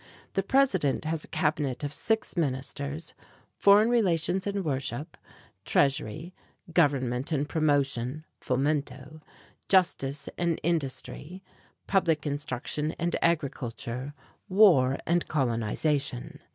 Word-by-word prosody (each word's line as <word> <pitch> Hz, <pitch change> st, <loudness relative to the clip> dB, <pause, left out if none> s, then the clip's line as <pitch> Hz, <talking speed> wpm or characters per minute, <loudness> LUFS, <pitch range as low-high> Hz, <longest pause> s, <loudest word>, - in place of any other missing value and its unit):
The 195 Hz, -, +1 dB
president 195 Hz, -, +2 dB
has 160 Hz, 0 st, -2 dB
a -, -, -5 dB
cabinet 145 Hz, -3 st, -1 dB
of 145 Hz, 0 st, -3 dB
six 220 Hz, +9 st, -1 dB
ministers: 140 Hz, 0 st, -3 dB, 0.4 s
Foreign 205 Hz, +3 st, +5 dB
Relations 185 Hz, -4 st, +1 dB
and 200 Hz, -2 st, -2 dB
Worship, 135 Hz, 0 st, -3 dB, 0.5 s
Treasury, 145 Hz, +4 st, 0 dB, 0.4 s
Government 135 Hz, -4 st, +1 dB
and 145 Hz, -1 st, 0 dB
Promotion 145 Hz, -2 st, 0 dB, 0.2 s
(Fomento), 140 Hz, +2 st, -2 dB, 0.5 s
Justice 145 Hz, -7 st, +2 dB
and 170 Hz, -2 st, 0 dB
Industry, 165 Hz, +3 st, -3 dB, 0.4 s
Public 165 Hz, -6 st, +1 dB
Instruction 145 Hz, +1 st, -2 dB
and 170 Hz, 0 st, -2 dB
Agriculture, 135 Hz, -4 st, -2 dB, 0.3 s
War 175 Hz, -10 st, +5 dB
and 170 Hz, +1 st, +1 dB
Colonization. 130 Hz, +1 st, -1 dB
150 Hz, 100 wpm, -28 LUFS, 135-170 Hz, 0.5 s, Foreign